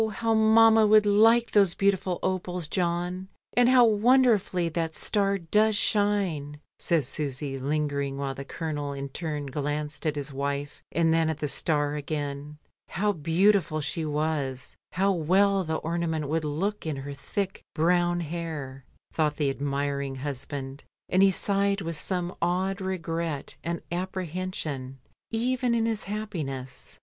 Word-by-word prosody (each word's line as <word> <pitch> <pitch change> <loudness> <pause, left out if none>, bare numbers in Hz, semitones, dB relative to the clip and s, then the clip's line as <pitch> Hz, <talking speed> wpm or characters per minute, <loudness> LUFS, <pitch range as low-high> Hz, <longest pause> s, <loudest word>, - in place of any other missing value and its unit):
how 225 +1 0
mamma 220 0 +6
would 215 0 +6
like 225 +3 +5
those 195 -4 +4
beautiful 195 -2 +1
opals, 180 -3 -2
John; 180 +2 -2 0.3
and 245 0 +5
how 255 -2 +7
wonderfully 220 -5 +3
that 165 0 -2
star 200 -1 +1
does 210 +5 +2
shine," 195 -9 0 0.2
says 160 -7 +1
Susy, 140 -1 -3
lingering, 140 -1 -1
while 140 -1 -2
the 135 - -7
Colonel 145 -1 -4
in 140 0 -5
turn 150 0 -4
glanced 150 +2 -3
at 150 - 0
his 145 -1 -5
wife 140 +1 -3
and 165 0 +2
then 165 -1 +2
at 160 - -2
the 150 - -2
star 145 0 0
again. 145 0 -4 0.3
How 205 +3 +1
beautiful 170 0 +2
she 160 +2 -2
was, 150 -4 -2 0.2
how 195 +2 +2
well 190 +3 +3
the 160 -2 -2
ornament 160 -2 -2
would 160 0 0
look 190 +8 -2
in 155 - -1
her 140 +1 -6
thick 190 +7 -4
brown 175 +1 +2
hair, 155 -5 -5 0.3
thought 150 -2 +1
the 145 -3 +1
admiring 140 0 -2
husband, 135 0 -5 0.3
and 185 - +3
he 195 - +7
sighed 200 +1 +1
with 165 -1 -3
some 180 +2 -1
odd 185 +3 0
regret 165 -5 -3
and 170 0 -3
apprehension 175 -7 -4 0.3
even 245 +1 0
in 225 -1 +1
his 225 -2 -1
happiness. 155 -12 -5
165 Hz, 145 wpm, -27 LUFS, 145-195 Hz, 0.3 s, how